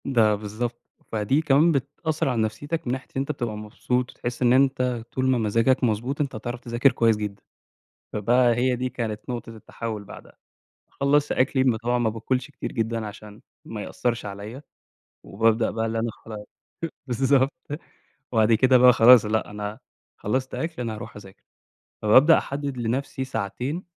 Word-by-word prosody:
ده 115 Hz, -5 st, +3 dB
بالضبط، 110 Hz, +4 st, -5 dB, 0.3 s
فدي 110 Hz, +7 st, +1 dB
كمان 150 Hz, +2 st, +4 dB
بتأثّر 145 Hz, +2 st, -1 dB
على 120 Hz, -3 st, 0 dB
نفسيتك 145 Hz, +9 st, -3 dB
من 120 Hz, -, 0 dB
ناحية 130 Hz, 0 st, -5 dB
إن -, -, 0 dB
أنت 140 Hz, -, -2 dB
بتبقى 120 Hz, -6 st, -4 dB
مبسوط، 125 Hz, +4 st, -2 dB
بتحس 120 Hz, +1 st, -6 dB
إن 125 Hz, -1 st, +5 dB
أنت 130 Hz, -3 st, +2 dB
طول 130 Hz, -, -1 dB
ما 130 Hz, -, +3 dB
مزاجك 115 Hz, +4 st, +2 dB
مضبوط 120 Hz, +5 st, 0 dB
،أنت 140 Hz, -5 st, -2 dB
هتعرَف 120 Hz, +2 st, -5 dB
تذاكر 120 Hz, +2 st, +2 dB
كويس 115 Hz, -3 st, +2 dB
جدًا، 105 Hz, -1 st, -5 dB, 0.7 s
فبقى 120 Hz, +3 st, +3 dB
هي 125 Hz, +1 st, +1 dB
دي 130 Hz, +1 st, -2 dB
كانت 115 Hz, -4 st, -4 dB
نقطة 120 Hz, -2 st, -5 dB
التحوّل 110 Hz, -1 st, -6 dB
بعدها، -, -, -13 dB, 0.5 s
خلّصت 145 Hz, +1 st, +1 dB
أكلي 130 Hz, 0 st, +2 dB
م 125 Hz, -4 st, +3 dB
طبعًا 120 Hz, +2 st, 0 dB
ما 115 Hz, -2 st, +1 dB
باكُلش 125 Hz, +5 st, -2 dB
كتير -, -, -6 dB
جدًا 115 Hz, -2 st, -2 dB
عشان 105 Hz, 0 st, -11 dB, 0.2 s
ما 110 Hz, -2 st, -6 dB
يأثّرش 120 Hz, -1 st, -2 dB
عليَّ، 105 Hz, +7 st, -7 dB, 0.6 s
وبابدأ 110 Hz, +2 st, +1 dB
بقى 110 Hz, +1 st, -2 dB
اللي 115 Hz, 0 st, -1 dB
أنا 115 Hz, 0 st, -1 dB
خلاص 105 Hz, -2 st, -10 dB, 0.6 s
بالضبط، 135 Hz, +2 st, +2 dB, 0.8 s
وبعد 110 Hz, -1 st, +3 dB
كده 130 Hz, +3 st, +5 dB
بقى 125 Hz, 0 st, +8 dB
خلاص 120 Hz, 0 st, +7 dB
لأ، 110 Hz, 0 st, -1 dB
أنا 105 Hz, +1 st, -5 dB, 0.4 s
خلَّصت 130 Hz, +5 st, -2 dB
أكل 160 Hz, -5 st, -3 dB
أنا 115 Hz, -2 st, -3 dB
هاروح 105 Hz, -, -9 dB
اذاكر، 95 Hz, -2 st, -13 dB, 0.6 s
فبابدأ 130 Hz, +10 st, +6 dB
أحدِّد 140 Hz, -1 st, -4 dB
لنَفسي 125 Hz, +3 st, -2 dB
ساعتين، 130 Hz, -, -3 dB
120 Hz, 165 wpm, -24 LUFS, 110-130 Hz, 0.8 s, بقى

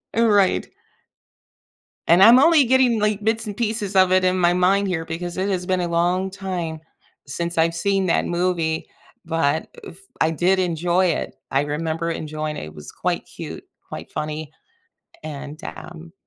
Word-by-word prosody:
Uh, 230 Hz, +1 st, +3 dB
right. 200 Hz, -3 st, +2 dB, 1.4 s
And 175 Hz, +3 st, +6 dB
I'm 235 Hz, +5 st, +9 dB
only 310 Hz, -1 st, +5 dB
getting, 250 Hz, -2 st, +3 dB
like, 210 Hz, 0 st, 0 dB
bits 220 Hz, +1 st, 0 dB
and 205 Hz, -2 st, -6 dB
pieces 215 Hz, -3 st, -2 dB
of 185 Hz, -1 st, +5 dB
it 185 Hz, 0 st, +4 dB
in 185 Hz, 0 st, +2 dB
my 175 Hz, -1 st, +3 dB
mind 195 Hz, +3 st, +2 dB
here 170 Hz, -3 st, -2 dB
because 175 Hz, +2 st, -5 dB
it 190 Hz, +2 st, -1 dB
has 180 Hz, -2 st, -2 dB
been 185 Hz, -1 st, 0 dB
a 175 Hz, -, -1 dB
long 175 Hz, +3 st, 0 dB
time 180 Hz, -5 st, -4 dB, 0.5 s
since 170 Hz, +4 st, -4 dB
I've 165 Hz, +1 st, +2 dB
seen 195 Hz, +2 st, 0 dB
that 165 Hz, -, +1 dB
movie, 170 Hz, -2 st, -1 dB, 0.4 s
but, 160 Hz, -2 st, 0 dB, 0.2 s
uh, -, -, -8 dB
f 170 Hz, -, -16 dB, 0.2 s
I 160 Hz, -, +3 dB
did 180 Hz, +4 st, +2 dB
enjoy 175 Hz, +1 st, +1 dB
it. 170 Hz, -, -2 dB, 0.2 s
I 135 Hz, -, +2 dB
remember 160 Hz, +3 st, -2 dB
enjoying 155 Hz, -1 st, -4 dB
it. -, -, -6 dB
It 75 Hz, -, -12 dB
was 75 Hz, -1 st, -10 dB
quite -, -, -2 dB
cute, -, -, -9 dB, 0.2 s
quite -, -, -9 dB
funny, 155 Hz, 0 st, -5 dB, 0.7 s
and, 150 Hz, 0 st, -8 dB
um 170 Hz, -1 st, -10 dB
175 Hz, 175 wpm, -22 LUFS, 160-195 Hz, 1.4 s, I'm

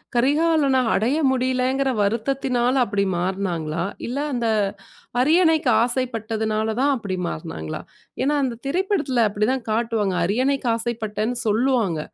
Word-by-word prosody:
கரிகாலன 280 Hz, +1 st, +3 dB
அடைய 245 Hz, +9 st, +1 dB
முடியலேங்கிற 260 Hz, +1 st, +1 dB
வருத்தத்தினால 245 Hz, +3 st, 0 dB
அப்பிடி 200 Hz, -1 st, 0 dB
மாறுனாங்களா? 175 Hz, -4 st, -2 dB, 0.2 s
இல்ல 250 Hz, +4 st, -4 dB, 0.2 s
அந்த 240 Hz, -2 st, -1 dB, 0.7 s
அரியணைக்கு 320 Hz, -2 st, +3 dB
ஆசைப்பட்டதுனால 220 Hz, -3 st, -1 dB
தான் 285 Hz, +1 st, +3 dB
அப்பிடி 200 Hz, -6 st, -4 dB
மாறுனாங்களா? 80 Hz, 0 st, -6 dB, 0.4 s
ஏன்னா 295 Hz, +2 st, +2 dB
அந்த 245 Hz, -3 st, -2 dB
திரைப்படத்தில 300 Hz, -, +1 dB
அப்பிடி 205 Hz, +1 st, 0 dB
தான் 255 Hz, -4 st, -4 dB
காட்டுவாங்க. 220 Hz, -4 st, 0 dB
அரியணைக்கு 255 Hz, +6 st, 0 dB
ஆசைப்பட்டேன்னு 225 Hz, 0 st, -2 dB
சொல்லுவாங்க. 220 Hz, -, +1 dB
240 Hz, 110 wpm, -22 LUFS, 210-270 Hz, 0.7 s, கரிகாலன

